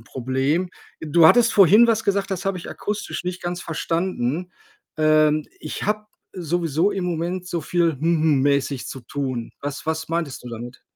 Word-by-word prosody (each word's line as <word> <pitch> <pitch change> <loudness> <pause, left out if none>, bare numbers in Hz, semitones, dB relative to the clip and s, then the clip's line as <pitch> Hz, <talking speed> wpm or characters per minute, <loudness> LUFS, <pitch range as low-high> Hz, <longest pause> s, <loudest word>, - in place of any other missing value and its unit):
'n 115 - -18
Problem. 135 +9 -1 0.3
Du 160 +1 +5
hattest 230 +4 +5
vorhin 205 +4 +7
was 220 -1 +1
gesagt, 200 0 0
das 190 0 -3
habe 195 -1 -1
ich 170 - -9
akustisch 210 -3 -4
nicht 180 0 -4
ganz 175 0 -3
verstanden. 165 -1 -2 0.5
Ähm: 155 -1 +3
„Ich 155 - -6
habe 210 +1 -1 0.3
sowieso 170 +1 0
im 190 -2 -3
Moment 175 +2 -3
so 170 - -2
viel 170 0 +1
‚hm 135 - -11 0.2
hm‘ 150 -4 +3
mäßig 140 -1 0
zu 135 - -7
tun.” 130 -1 -4
Was 145 +1 -5
was 160 0 -2
meintest 165 -6 -3
du 125 - -7
damit? 120 +2 -8
165 Hz, 175 wpm, -22 LUFS, 145-185 Hz, 0.5 s, vorhin